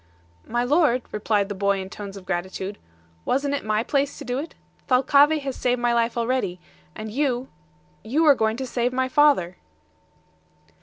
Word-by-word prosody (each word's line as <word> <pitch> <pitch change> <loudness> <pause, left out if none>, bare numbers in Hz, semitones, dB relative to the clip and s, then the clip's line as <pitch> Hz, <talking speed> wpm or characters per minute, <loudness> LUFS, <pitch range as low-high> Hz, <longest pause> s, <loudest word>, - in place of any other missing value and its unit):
"My 240 +1 0
lord," 255 -2 +2
replied 210 -1 0
the 205 - -4
boy 200 0 0
in 190 - -5
tones 200 0 -8
of 190 - -12
gratitude, 190 +2 -4 0.4
"wasn't 280 - 0
it 285 - -2
my 215 +1 0
place 280 +1 -1
to 290 - -8
do 250 +1 -2
it? 315 +4 -7 0.3
Thalcave 280 +4 +4
has 270 -2 -3
saved 250 0 0
my 240 0 +1
life 235 0 +1
already, 235 -6 -1 0.4
and 215 - -6
you 260 0 -1 0.5
you 295 +9 +1
are 295 - +8
going 220 -3 0
to 265 - -3
save 245 0 -1
my 260 0 0
father." 265 - +3
245 Hz, 170 wpm, -24 LUFS, 210-275 Hz, 0.5 s, are